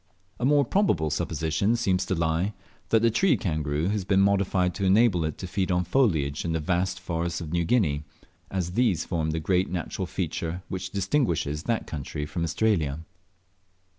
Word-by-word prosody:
A 125 - 0
more 145 0 +4
probable 105 - +1
supposition 80 - 0
seems 95 -5 0
to 95 - 0
lie, 85 +5 0 0.3
that 115 0 +3
the 115 - +4
tree 150 - +3
kangaroo 75 -5 -1
has 105 -1 -1
been 95 +1 +2
modified 95 -2 +2
to 100 - -4
enable 95 -2 +4
it 80 - -3
to - - -6
feed 95 +1 -1
on 90 0 +2
foliage 80 - +1
in 85 - -2
the 80 - 0
vast 90 +3 -1
forests 85 -1 -2
of 80 -3 -6
New 85 -1 +1
Guinea, 80 -9 +1 0.5
as 90 -3 -2
these 95 -5 +1
form 80 -3 -1
the 80 +1 -1
great 90 +3 +1
natural 85 -2 -3
feature 85 +2 -3
which 95 0 -4
distinguishes 85 - 0
that 115 -1 0
country 75 0 -5
from 85 +3 -3
Australia. 80 -4 0
90 Hz, 175 wpm, -26 LUFS, 80-100 Hz, 0.5 s, more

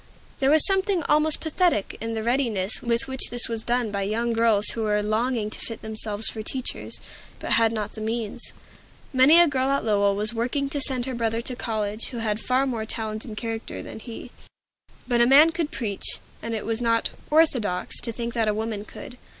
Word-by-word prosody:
There 270 -1 +3
was 310 +1 +6
something 385 -3 +2
almost 305 +1 +3
pathetic 320 - +1
in 225 0 -3
the 220 - -2
readiness 230 -5 0
with 235 +2 +1
which 265 0 -1
this 240 0 -1
was 225 -1 -4
done 240 -2 0
by 200 -1 -2
young 230 +4 0
girls 225 -2 +3
who 230 - -3
were 210 -1 +1
longing 215 0 0
to - - -8
fit 230 - -6
themselves 220 -1 -2
for 220 - -3
teachers, 255 +4 -4 0.4
but - - -5
had 225 -1 +4
not 210 -2 -3
the 220 - -8
means. 220 -1 -3 0.6
Many 270 +6 +7
a 345 - +7
girl 265 -2 0
at 275 -2 +1
Lowell 200 -2 +3
was 210 +2 0
working 255 +5 -1
to 290 -2 -1
send 260 -3 0
her 260 - -4
brother 230 -1 0
to 250 +1 -3
college, 215 -2 -3
who 245 - -7
had 215 -2 -1
far 255 +3 +1
more 235 -5 -2
talent 220 -1 -4
and 215 -4 -8
character 225 -1 -5
than - - -8
he; 235 +1 -9 0.8
but 240 -1 +2
a 235 - +5
man 295 +5 +7
could 325 -2 -2
preach, 210 -9 -2 0.2
and 230 0 -3
it 215 - -4
was 225 +1 -2
not 230 -1 +2 0.2
"orthodox" 255 - +2
to 235 - -1
think 235 +1 -4
that 230 -2 +1
a 210 - +1
woman 220 -1 -3
could. 245 +3 -11
230 Hz, 205 wpm, -25 LUFS, 215-260 Hz, 0.8 s, Many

